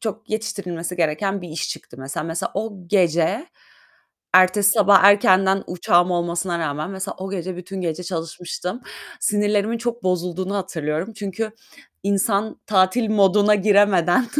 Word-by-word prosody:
çok 220 0 -6
yetiştirilmesi 180 -6 -4
gereken 180 +4 -1
bir 175 - -8
iş 155 -1 -4
çıktı 120 - -9
mesela. 135 +3 -5
Mesela 165 +1 -3
o 220 +2 -3 0.2
gece, 180 - +1 0.9
ertesi 185 +2 +5
sabah 205 -3 +5
erkenden 195 -1 +5
uçağım 175 0 +2
olmasına 175 0 -1
rağmen, 155 +1 -3
mesela 190 0 -5
o 190 +1 -6
gece 185 -1 -4
bütün 185 +2 -7
gece 170 0 -3
çalışmıştım. 175 +5 -5 0.4
Sinirlerimin 210 +2 +1
çok 240 0 -4
bozulduğunu 180 +1 -2
hatırlıyorum. 170 0 -3
Çünkü 210 +2 -4 0.5
insan 200 +1 0
tatil 205 +3 +2
moduna 205 0 +4
giremeden, 200 +1 +3
190 Hz, 130 wpm, -21 LUFS, 175-205 Hz, 0.9 s, ertesi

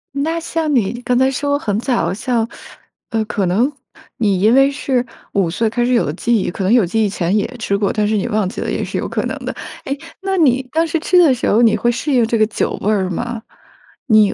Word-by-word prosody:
那 320 +4 -1
像 325 -2 -2
你 240 -1 0
刚 250 0 0
才 260 +1 +4
说 285 +2 0
很 205 -7 -1
早， 245 -3 0
像 230 +2 -1 0.6
呃， 225 -1 0
可 205 -2 -1
能 215 +11 +2 0.5
你 200 -5 +1
因 215 +3 +5
为 270 +1 +5
是 260 -3 -1 0.3
5 195 -4 +1
岁 220 +6 0
开 240 +2 0
始 250 - +1
有 235 - +3
了 145 - -3
记 235 +7 0
忆， - - -1
可 190 +2 -4
能 190 - +1
有 240 -5 +5
记 220 +6 0
忆 - - 0
前 185 -1 -1
也 210 - +2
吃 200 -3 0
过， 200 -1 0
但 210 -1 +1
是 215 0 +1
你 195 - -1
忘 210 -2 0
记 185 - -5
了， - - -2
也 - - -2
是 - - -4
有 - - -2
可 - - -2
能 - - -3
的。 - - -3 0.3
诶， 275 +1 -2 0.2
那 385 0 -1
你 260 -5 +3
当 325 +1 +2
时 330 - -1
吃 360 +3 +2
的 330 -7 +6
时 245 - -1
候， 220 - +4
你 225 -2 +5
会 240 +3 +1
适 290 +5 -3
应 245 -3 +4
这 230 +1 0
个 215 - +4
酒 215 - -1
味 210 - +1
儿 190 -3 0
吗？ 235 +5 -4 0.7
你 215 -4 +5
230 Hz, 270 characters per minute, -18 LUFS, 205-265 Hz, 0.7 s, 的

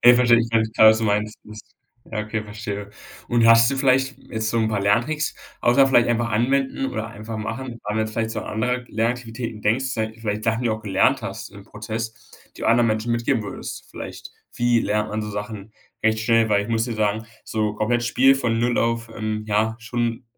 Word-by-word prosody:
Verstehe 120 -1 +7
ich, 115 0 0 0.3
klar 110 - +8
was 110 - +2
du 115 - -2
meinst 105 +1 0
ist 110 0 -13 0.3
ja 110 - -4
okay, 105 +1 -3
verstehe 105 -1 -6 0.4
und 120 -1 +3
hast 115 +1 +7
du 140 - -2
vielleicht 135 0 +2
jetzt 110 -1 -4
so 115 - 0
'n 110 -1 +2
paar 105 -2 -1
Lerntricks 120 +10 +1 0.3
außer 135 +3 +5
vielleicht 120 -3 +4
einfach 120 0 0
anwenden 135 +4 +1
oder 110 -3 -3
einfach 110 0 -7
machen, 115 +4 -4
wenn 115 -1 -8 0.2
man - - +1
jetzt 110 0 -1
vielleicht 110 0 -1
so 110 - -3
andere 125 +4 -2
Lernaktivitäten 115 -1 -3
denkst, 115 +6 +2
sei 110 -4 -2
es 115 - -18
vielleicht 105 -1 -2
Sachen 115 +1 +1
die - - 0
du 110 - +1
auch 110 - -9
gelernt 115 +5 +2
hast 115 +1 -6
im 100 -1 -12
Prozess, 110 +2 -6 0.2
die - - -6
anderen 115 0 +4
Menschen 110 +2 0
mitgeben 120 0 0
würdest, 100 - -7
vielleicht - - -8 0.2
wie 120 -1 +2
lernt 105 +1 -1
man 110 0 -2
so 105 - -5
Sachen 105 0 -6 0.3
recht 110 0 +2
schnell, 115 0 +3
weil 100 -1 +3
ich 105 - -8
muss 115 -1 +1
dir 120 -2 -4
sagen, 110 0 0 0.2
so 105 -1 -1
komplett 120 +3 0
Spiel 130 +3 +4
von 120 -4 0
0 120 +1 +1
auf, 115 0 0
ähm, 110 0 -3
ja, 110 +1 +1
schon 120 +1 -3
115 Hz, 210 wpm, -23 LUFS, 110-120 Hz, 0.4 s, klar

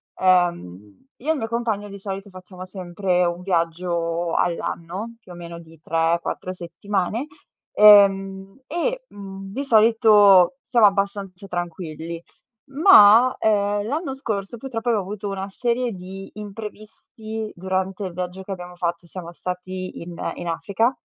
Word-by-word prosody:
Ehm, 175 - 0
io 290 +6 -7
e - - +6
il 320 - 0
mio 225 - -3
compagno, 225 -3 -2
di 200 0 -9
solito, 195 0 -6
facciamo 185 0 -11
sempre 185 -1 -1
un 175 0 -1
viaggio 170 -1 -1
all'anno, 175 +6 -2
più 185 - -15
o - - -9
meno 170 -1 -8
di 165 -1 -16
tre 165 +1 +1
quattro 185 - -4
settimane. 195 - -3 0.4
Ehm, 195 0 +5
e, - - -2
mhmm, 195 - -9
di 270 +6 -3
solito 215 -3 +6
siamo 240 -4 +4
abbastanza 195 -1 -2
tranquilli. 170 -2 -5 0.5
Ma, 255 - +7
ehm, 205 -1 +1
l'anno 285 +2 -2
scorso, 220 -5 -4
purtroppo, 240 -1 -4
ho 220 - +2
avuto 200 +2 -5
una 195 0 -4
serie 240 +3 -1
di 190 0 -9
imprevisti 215 +1 -8
durante 190 +2 -2
il 180 - -6
viaggio 180 +1 -5
che 195 - -8
abbiamo 180 -1 -7
fatto, 170 0 -3
siamo 170 -1 -8
stati 185 +1 -6
in 170 0 -8 0.2
in 175 - -6
Africa 200 - 0
195 Hz, 140 wpm, -22 LUFS, 175-215 Hz, 0.5 s, Ma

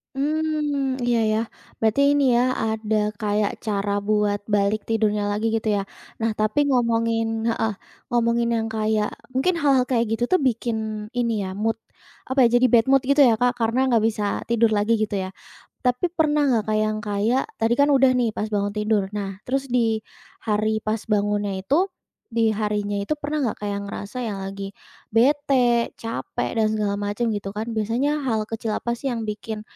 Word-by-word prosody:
Hmm, 295 -2 -1
iya 235 -1 +3
iya, 215 - +2 0.4
berarti 220 +4 +2
ini 285 -1 +3
ya, 245 - +4 0.2
ada 220 -1 -1 0.2
kayak 210 -1 +1
cara 205 -1 -1 0.2
buat 210 -1 +2
balik 205 +1 +1
tidurnya 210 -2 +1
lagi 215 +2 0
gitu 220 0 -2
ya. 200 - 0 0.4
Nah, 225 0 +1
tapi 215 +6 +1
ngomongin 230 -2 +1
heeh, 225 -1 0 0.4
ngomongin 235 0 +2
yang 225 0 -1
kayak 215 -1 0 0.2
mungkin 305 +8 +1
hal-hal 275 -5 +3
kayak 235 -3 +2
gitu 240 +2 0
tuh - - +7
bikin 220 -2 -3
ini 235 -2 +1 0.2
ya, 190 - -6
mood, 225 +1 -1 0.5
apa 260 0 +4
ya, 235 - +6
jadi 255 - +6
bad 230 0 +5
mood 270 - +6
gitu 280 0 +6
ya 230 -2 +3
Kak, 245 0 +2
karena 240 +3 +1
enggak 230 -3 +3
bisa 215 -2 0 0.2
tidur 235 -1 +3
lagi 215 +2 +2
gitu 210 -1 -1
ya. 190 -1 -3 0.5
Tapi 250 +8 +1
pernah 300 -2 +2
enggak 235 -5 +2
Kak 215 - +2
yang 215 0 0
kayak, 210 +5 +1 0.2
tadi 225 +1 +2
kan 285 +3 +4
udah 265 -2 +5
nih 235 -3 +1
pas 210 - -3
bangun 205 -1 -1
tidur. 210 -1 +1
Nah, 200 -1 -5
terus 270 +2 -2
di 230 -3 +1 0.4
hari 215 0 0
pas 215 0 -2
bangunnya 205 -1 0
itu, 325 - +1 0.4
di 230 -1 +2
harinya 210 -1 -1
itu 205 - -1
pernah 295 0 -2
enggak 230 - -1
kayak 205 -1 -3
ngerasa 245 +5 -5
yang 205 -4 -3
lagi 195 0 -6 0.4
bete, 250 -1 +3
cape, 230 0 -3
dan 215 -1 +2
segala 210 -2 0
macem 205 +3 -2
gitu 195 -1 -4
kan. 215 +3 -4
Biasanya 255 +8 0
hal 220 -4 -1
kecil 225 -1 -3
apa 235 0 -2
sih 275 - -12
yang 230 -1 -3
bikin, 210 0 -5
225 Hz, 180 wpm, -23 LUFS, 210-245 Hz, 0.5 s, tuh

